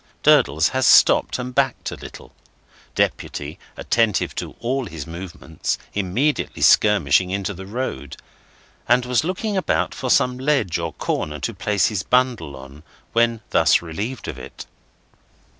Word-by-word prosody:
Durdles 75 Hz, +3 st, +4 dB
has 130 Hz, -1 st, +1 dB
stopped -, -, +5 dB
and 125 Hz, 0 st, -5 dB
backed 135 Hz, -1 st, 0 dB
a -, -, -5 dB
little -, -, -12 dB, 0.6 s
(Deputy, 75 Hz, +3 st, -2 dB, 0.2 s
attentive 115 Hz, -4 st, +1 dB
to -, -, -5 dB
all 125 Hz, +1 st, -2 dB
his 80 Hz, -5 st, -7 dB
movements, 85 Hz, -2 st, -5 dB, 0.2 s
immediately 105 Hz, +10 st, -1 dB
skirmishing 95 Hz, -4 st, +4 dB
into 100 Hz, +1 st, -2 dB
the 95 Hz, +1 st, -10 dB
road), 120 Hz, -, -5 dB, 0.7 s
and 120 Hz, +1 st, +4 dB
was 125 Hz, +3 st, +1 dB
looking 190 Hz, +5 st, -2 dB
about 190 Hz, -, 0 dB
for 135 Hz, -4 st, -4 dB
some 125 Hz, +1 st, +2 dB
ledge 130 Hz, -, +1 dB
or 85 Hz, -1 st, -4 dB
corner 75 Hz, 0 st, -3 dB
to -, -, -2 dB
place 105 Hz, -2 st, 0 dB
his 105 Hz, -4 st, -2 dB
bundle 125 Hz, -, 0 dB
on, 70 Hz, +3 st, -12 dB, 0.3 s
when 115 Hz, -1 st, +2 dB
thus -, -, +4 dB
relieved 100 Hz, +10 st, -5 dB
of -, -, -6 dB
it. -, -, -10 dB
105 Hz, 140 wpm, -21 LUFS, 85-125 Hz, 0.7 s, stopped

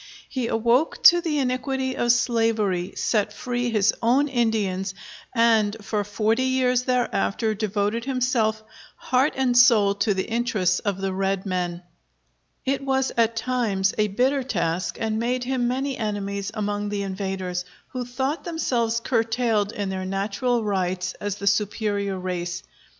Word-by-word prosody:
He 255 Hz, -4 st, -2 dB
awoke 235 Hz, +7 st, +1 dB
to 345 Hz, 0 st, +8 dB
the 320 Hz, -3 st, -1 dB
iniquity 260 Hz, 0 st, -1 dB
of 240 Hz, -, +3 dB
slavery, 225 Hz, -6 st, +1 dB
set 210 Hz, -2 st, 0 dB
free 245 Hz, +3 st, -2 dB
his 210 Hz, -2 st, +3 dB
own 260 Hz, +6 st, +3 dB
Indians, 205 Hz, -6 st, 0 dB, 0.4 s
and 225 Hz, -2 st, +3 dB
for 210 Hz, 0 st, -2 dB
forty 215 Hz, +4 st, 0 dB
years 255 Hz, -1 st, +2 dB
thereafter 230 Hz, -3 st, 0 dB
devoted 210 Hz, +2 st, -1 dB
himself 245 Hz, -5 st, 0 dB, 0.3 s
heart 260 Hz, +4 st, +1 dB
and 255 Hz, -2 st, +1 dB
soul 230 Hz, -5 st, +6 dB
to 200 Hz, 0 st, 0 dB
the 190 Hz, -, 0 dB
interests 220 Hz, -6 st, +1 dB
of 200 Hz, -2 st, -2 dB
the 195 Hz, -1 st, -2 dB
red 195 Hz, 0 st, -1 dB
men. 180 Hz, -2 st, -2 dB, 0.8 s
It 270 Hz, +1 st, 0 dB
was 265 Hz, -1 st, +1 dB
at 230 Hz, -1 st, +2 dB
times 225 Hz, -5 st, 0 dB
a 210 Hz, -1 st, +2 dB
bitter 255 Hz, +7 st, +1 dB
task 175 Hz, -7 st, -2 dB
and 220 Hz, -1 st, -1 dB
made 245 Hz, +2 st, -1 dB
him 250 Hz, -1 st, 0 dB
many 265 Hz, +2 st, -2 dB
enemies 200 Hz, -2 st, -3 dB
among 205 Hz, -1 st, -2 dB
the 205 Hz, -1 st, -2 dB
invaders, 190 Hz, -2 st, -3 dB, 0.3 s
who 255 Hz, -1 st, -4 dB
thought 265 Hz, +5 st, -2 dB
themselves 240 Hz, -9 st, -1 dB
curtailed 225 Hz, -3 st, +1 dB
in 205 Hz, -3 st, -3 dB
their 190 Hz, -1 st, -3 dB
natural 200 Hz, +5 st, -1 dB
rights 185 Hz, -2 st, -1 dB
as 205 Hz, -1 st, -2 dB
the 200 Hz, -, -7 dB
superior 200 Hz, -1 st, 0 dB
race. 180 Hz, -1 st, -4 dB
220 Hz, 145 wpm, -24 LUFS, 200-250 Hz, 0.8 s, to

